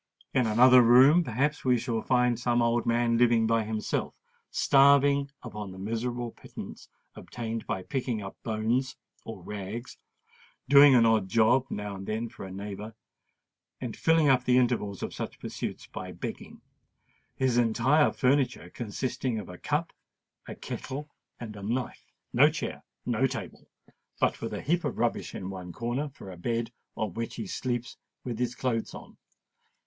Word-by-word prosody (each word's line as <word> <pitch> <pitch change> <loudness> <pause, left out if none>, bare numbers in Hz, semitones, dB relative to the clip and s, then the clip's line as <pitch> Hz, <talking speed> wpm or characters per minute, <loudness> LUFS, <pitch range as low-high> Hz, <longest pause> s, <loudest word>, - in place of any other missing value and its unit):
In 125 -3 +2
another 125 +3 +7
room, 130 +8 +7
perhaps, 145 +3 -1
we 125 -1 +3
shall 115 -2 -2
find 125 -2 +2
some 120 0 +1
old 120 0 +1
man, 115 0 +2
living 120 -2 +4
by 115 0 +2
himself—starving 140 +5 +2
upon 105 -4 -6
the 95 - -10
miserable 115 +4 -3
pittance - - -10 0.2
obtained 115 -1 -6
by 95 - -2
picking 125 -2 -2
up 100 -2 -7
bones 115 +4 -1 0.3
or 105 -5 -8
rags, 105 +5 -6 0.7
doing 140 0 +8
an 115 -2 +6
odd 110 -4 +2
job 120 +5 +3
now 105 0 -4
and 95 0 -8
then 110 +2 -2
for 120 -3 -9
a 95 - -8
neighbour, 105 +3 -7 0.8
and 120 -4 -5
filling 160 -2 +3
up 130 -2 +4
the 125 0 +3
intervals 115 -6 0
of - - -4
such - - -5
pursuits - - -5
by - - -7
begging,—his 125 -2 -5
entire 120 +6 +3
furniture 130 -9 +1
consisting 120 +1 -3
of 105 -4 -6
a 90 - -10
cup, - - -1 0.5
a - - -7
kettle, 145 +3 -6 0.3
and 110 -3 -7
a 100 - -9
knife—no 115 +4 0
chair, - - -5 0.2
no - - +2
table—but - - -5
with - - -4
a - - -4
heap 170 +3 +1
of - - -3
rubbish - - -1
in 95 +1 -5
one 90 -2 -7
corner 120 - -3
for 100 -8 -11
a 90 - -10
bed, 115 +5 -2 0.3
on 105 -5 -2
which 115 +3 -4
he 115 - -5
sleeps 120 +4 -3 0.3
with 120 -3 -5
his 125 0 -1
clothes 115 -4 -2
on. - - -11
120 Hz, 155 wpm, -28 LUFS, 110-130 Hz, 0.8 s, doing